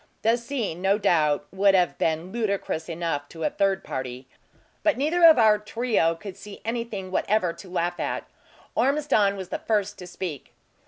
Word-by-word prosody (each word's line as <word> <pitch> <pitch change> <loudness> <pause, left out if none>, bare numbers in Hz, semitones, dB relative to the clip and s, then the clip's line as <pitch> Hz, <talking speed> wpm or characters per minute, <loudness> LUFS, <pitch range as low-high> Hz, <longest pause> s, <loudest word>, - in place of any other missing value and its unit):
The 225 +2 +4
scene, 235 -8 -4
no 195 +2 +3
doubt, 155 -7 +2
would 195 +1 +4
have 180 -2 +2
been 165 +3 0
ludicrous 200 -7 -2
enough 165 -4 -3
to 165 -1 -7
a - - +1
third 195 -1 +1
party; 130 0 -5 0.5
but 310 -4 +2
neither 315 +6 +1
of 325 -3 +9
our 215 -3 +5
trio 210 -6 0
could 190 +2 -9
saw 205 -1 -10
anything 225 -5 -4
whatever 190 -2 +1
to 190 - -12
laugh 175 -1 -1
at. - - -3 0.5
Ormiston 265 -8 +2
was 190 -2 -7
the - - -3
first 205 -2 -1
to 180 - -8
speak. 175 -6 -6
195 Hz, 170 wpm, -25 LUFS, 170-225 Hz, 0.5 s, of